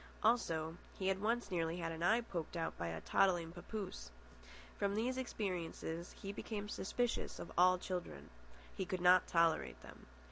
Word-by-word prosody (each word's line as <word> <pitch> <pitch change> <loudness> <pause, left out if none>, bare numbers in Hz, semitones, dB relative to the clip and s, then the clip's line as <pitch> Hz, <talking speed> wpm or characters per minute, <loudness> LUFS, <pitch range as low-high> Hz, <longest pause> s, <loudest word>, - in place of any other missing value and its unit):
Also, 165 -8 +2 0.2
he 190 0 +1
had 190 0 0
once 225 -1 0
nearly 165 -1 0
had 165 -2 -2
an 165 0 -6
eye 220 +7 +4
poked 175 -7 -4
out 165 -1 -2
by 85 - -3
a 80 -1 -4
toddling 175 -4 +3
papoose. 175 - -6 0.7
From 200 0 +1
these 240 +4 +1
experiences 180 -8 -3
he 195 - -4
became 210 0 -4
suspicious 240 +4 -1
of - - -7
all 185 +1 +6
children. 175 - -5 0.4
He - - -1
could 185 0 -3
not 180 0 +6
tolerate 165 -2 +2
them. - - -13
180 Hz, 165 wpm, -38 LUFS, 165-205 Hz, 0.7 s, all